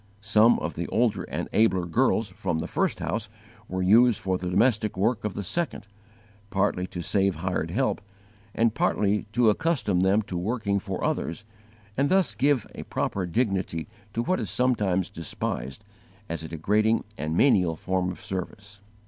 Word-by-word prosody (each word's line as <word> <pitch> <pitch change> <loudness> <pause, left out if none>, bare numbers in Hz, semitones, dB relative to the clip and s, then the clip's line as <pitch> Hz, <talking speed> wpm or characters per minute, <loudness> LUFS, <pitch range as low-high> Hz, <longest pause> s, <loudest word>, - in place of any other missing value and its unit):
Some 110 +2 +5
of 85 - -3
the 85 +1 -4
older 115 -2 +1
and - - -4
abler 95 -5 +3
girls 115 +3 +1
from 90 -3 -3
the 80 - -3
first - - 0
house 110 -1 -2 0.4
were 95 0 -2
used 115 +4 +5
for 95 -1 -1
the 90 - -3
domestic 110 +1 +2
work 110 +4 +1
of 105 -2 -3
the 100 - -3
second, 165 - -2 0.6
partly 95 -2 0
to 90 -1 -6
save 95 +1 +1
hired 85 -1 -2
help, 130 +9 0 0.5
and 115 -1 +2
partly 105 -1 +1
to 120 -1 +5
accustom 115 - 0
them 95 +4 +3
to 95 - -7
working 100 0 -1
for - - -5
others 85 +6 -2 0.5
and 140 +3 +1
thus 190 -1 +3
give 140 -3 +2
a - - -7
proper 95 -2 -2
dignity 95 -5 -1 0.3
to 115 - -1
what 185 +8 0
is - - -3
sometimes 105 -8 +1
despised 65 -5 -4 0.4
as 85 -1 -4
a 80 - -6
degrading 105 +8 +1
and 80 +2 -2
menial 95 -11 +4
form 95 +2 -1
of 90 - -9
service. 100 +2 -6
100 Hz, 165 wpm, -26 LUFS, 90-115 Hz, 0.6 s, Some